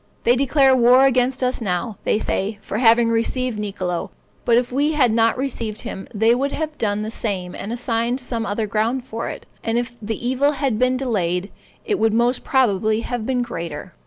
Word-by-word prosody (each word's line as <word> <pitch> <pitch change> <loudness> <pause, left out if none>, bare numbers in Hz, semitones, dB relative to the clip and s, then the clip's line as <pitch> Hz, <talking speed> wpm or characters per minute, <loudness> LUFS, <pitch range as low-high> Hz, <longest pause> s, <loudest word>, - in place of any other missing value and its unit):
They 240 - +4
declare 270 0 +4
war 250 +2 +6
against 255 0 +2
us 255 0 0
now, 195 +1 -2
they - - +2
say, 205 -1 -2
for 210 - -3
having 230 -1 +5
received 230 0 0
Niccolo; 190 -4 -3 0.4
but 235 -1 +4
if 245 0 0
we 290 +4 +1
had 255 -7 +3
not 230 +1 +3
received 235 -5 -3
him, 190 - -7
they 225 +2 +3
would 275 +3 -1
have 310 -1 -3
done 210 -1 0
the 220 - -4
same 190 -6 -3
and 205 - -6
assigned 235 +1 -1
some 240 -3 -3
other 215 0 -2
ground 225 +5 -1
for 230 -3 -4
it; - - -8 0.2
and 225 +1 0
if 240 0 -3
the 220 +1 -3
evil 275 +3 +2
had 270 -6 -1
been 255 0 +2
delayed, 195 -7 -1 0.3
it 415 -3 0
would 225 -1 +2
most 240 +2 +2
probably 220 -4 +2
have 240 -2 -4
been 250 -2 +1
greater. 170 -9 -6
235 Hz, 195 wpm, -21 LUFS, 215-255 Hz, 0.4 s, war